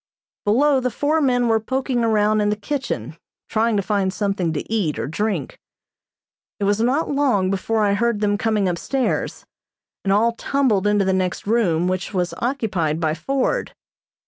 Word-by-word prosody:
Below 270 Hz, +7 st, +3 dB
the 250 Hz, 0 st, 0 dB
four 295 Hz, +6 st, 0 dB
men 245 Hz, -3 st, +2 dB
were 225 Hz, -1 st, +3 dB
poking 255 Hz, +1 st, -1 dB
around 215 Hz, -1 st, +2 dB
in 205 Hz, -, +2 dB
the 210 Hz, -, +1 dB
kitchen, 205 Hz, -, -4 dB, 0.3 s
trying 225 Hz, 0 st, +1 dB
to 200 Hz, -, 0 dB
find 195 Hz, -2 st, 0 dB
something 195 Hz, -4 st, -1 dB
to 150 Hz, -, -4 dB
eat 200 Hz, -9 st, -1 dB
or -, -, -2 dB
drink. 170 Hz, -1 st, -3 dB, 1.0 s
It -, -, -2 dB
was 205 Hz, +1 st, +2 dB
not 270 Hz, +8 st, +1 dB
long 250 Hz, -10 st, +2 dB
before 215 Hz, +3 st, 0 dB
I 200 Hz, -, +2 dB
heard 235 Hz, +1 st, +1 dB
them 205 Hz, -1 st, +1 dB
coming 210 Hz, -2 st, +1 dB
upstairs, 240 Hz, +9 st, -2 dB, 0.6 s
and 195 Hz, -, 0 dB
all 220 Hz, +4 st, +3 dB
tumbled 230 Hz, -5 st, +1 dB
into 205 Hz, -1 st, +2 dB
the 190 Hz, -, +2 dB
next 185 Hz, -1 st, -1 dB
room, 185 Hz, -6 st, +2 dB
which 185 Hz, +2 st, -3 dB
was 180 Hz, -1 st, 0 dB
occupied 195 Hz, -, -1 dB
by 160 Hz, -2 st, 0 dB
Ford. 270 Hz, +11 st, -1 dB
210 Hz, 170 wpm, -21 LUFS, 190-240 Hz, 1.0 s, Below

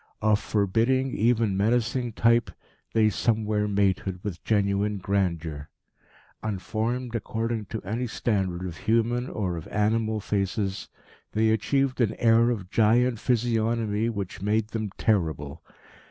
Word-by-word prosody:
Of 105 Hz, -1 st, +3 dB
forbidding, 115 Hz, +7 st, +1 dB
even 115 Hz, -2 st, +2 dB
menacing 120 Hz, +3 st, +1 dB
type, 115 Hz, +2 st, +3 dB, 0.4 s
they 110 Hz, -1 st, +4 dB
somewhere 105 Hz, -1 st, 0 dB
mated 95 Hz, -2 st, 0 dB
with 95 Hz, -5 st, -5 dB
genuine 100 Hz, -1 st, +1 dB
grandeur. 85 Hz, -6 st, -2 dB, 0.7 s
Unformed, 110 Hz, +4 st, -2 dB
according 115 Hz, -1 st, -2 dB
to 110 Hz, -, -6 dB
any 115 Hz, +7 st, -2 dB
standard 95 Hz, -6 st, -1 dB
of 85 Hz, -3 st, -6 dB
human 115 Hz, +3 st, +1 dB
or 90 Hz, -5 st, -2 dB
of 80 Hz, -, -8 dB
animal 110 Hz, +1 st, 0 dB
faces, 100 Hz, 0 st, -2 dB, 0.4 s
they 110 Hz, +1 st, +3 dB
achieved 130 Hz, +4 st, +1 dB
an 110 Hz, -2 st, +1 dB
air 115 Hz, 0 st, +4 dB
of 100 Hz, -6 st, -3 dB
giant 115 Hz, +2 st, +3 dB
physiognomy 115 Hz, -2 st, 0 dB
which 100 Hz, -6 st, -5 dB
made 105 Hz, +2 st, 0 dB
them 110 Hz, -2 st, -3 dB
terrible. 80 Hz, -7 st, 0 dB
110 Hz, 125 wpm, -26 LUFS, 100-115 Hz, 0.7 s, they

